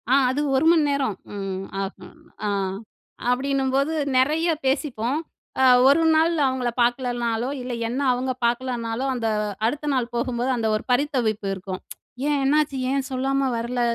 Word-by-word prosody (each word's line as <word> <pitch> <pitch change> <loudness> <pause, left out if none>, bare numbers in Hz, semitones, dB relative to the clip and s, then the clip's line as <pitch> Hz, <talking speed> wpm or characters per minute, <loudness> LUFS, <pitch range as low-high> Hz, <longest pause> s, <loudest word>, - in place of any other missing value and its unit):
ஆ. - - +4 0.2
அது 265 +3 0
1 265 +4 +2
மண் 320 -3 +4
நேரம் 270 -8 0 0.2
ம். 195 -1 -4 0.2
ஆகும். 200 +10 -9 0.3
ஆ. - - +1 0.8
அப்படின்னும்போது 270 +3 +1 0.2
நெறையா 315 +6 +2
பேசிப்போம். 265 -1 0 0.4
அ - - +5 0.2
1 280 +4 +5
நாள் 325 +2 +3
அவுங்கள 260 -2 -1
பாக்கலன்னாளோ, 240 -1 0
இல்ல, 250 0 -4
என்ன 250 +4 -2
அவுங்க 255 +1 -1
பாக்கலன்னாளோ, 240 0 -1
அந்த 235 -3 -2 0.4
அடுத்த 295 +6 -1
நாள் 245 -2 -1
போகும்போது, 240 +1 -1
அந்த 225 -1 0
ஒரு 215 - -3
பரித்தவிப்பு 245 -6 0
இருக்கும். 190 0 -6 0.3
ப்ச் 250 - -7
"ஏன்? 295 - +2
என்னாச்சு? 290 0 +2
ஏன் 275 0 0
சொல்லாம 270 +1 0
வரல? 240 +2 -2
255 Hz, 145 wpm, -23 LUFS, 235-275 Hz, 0.8 s, அ